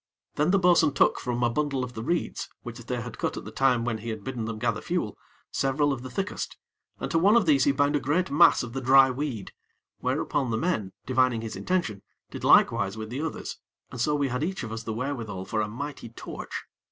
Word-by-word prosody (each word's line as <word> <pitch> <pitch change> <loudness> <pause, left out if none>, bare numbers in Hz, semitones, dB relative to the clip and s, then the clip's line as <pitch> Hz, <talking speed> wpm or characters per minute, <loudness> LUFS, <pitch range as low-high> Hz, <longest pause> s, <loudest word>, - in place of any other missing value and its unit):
Then 150 +3 +1
the 195 - +4
bo'sun 170 -5 +4
took - - +4
from 125 -1 -2
a 120 - +4
bundle 140 -1 0
of 125 -1 -6
the 110 - -5
reeds, 170 +9 -2
which 120 -1 -7
they 120 +1 -3
had 115 -1 -8
cut - - -1
at - - -6
the 105 - -7
time 125 0 +2
when 115 -2 -1
he 115 +2 -6
had 110 -2 -5
bidden 120 -1 -4
them 110 -1 -4
gather 115 -1 -1
fuel, 170 - -2 0.4
several 140 +1 +1
of 125 - -5
the 130 - -7
thickest, 195 +10 -4 0.4
and - - -4
to 165 - +3
one 200 +6 +5
of 235 -5 +5
these 140 -4 +4
he - - +5
bound 145 +2 +2
a - - +3
great 160 +7 0
mass 165 0 +6
of 120 -1 -7
the 135 - -3
dry 135 +1 +6
weed; 130 -6 -4 0.5
whereupon 135 -4 0
the 110 - 0
men, 110 - -1
divining 130 -3 +2
his 115 -1 -5
intention, 175 - -1 0.3
did - - -7
likewise 100 +2 +4
with 110 0 -6
the 130 +4 -3
others, 160 -1 -5 0.3
and 125 - -4
so 150 +4 +2
we 140 -2 +1
had 125 +4 -2
each 185 -2 -2
of 115 - -5
us 115 0 -4
the 115 - -5
wherewithal 115 -6 -4
for 110 +2 -1
a 105 - -1
mighty 125 +2 -6
torch. 115 - -7
130 Hz, 235 wpm, -27 LUFS, 115-145 Hz, 0.5 s, mass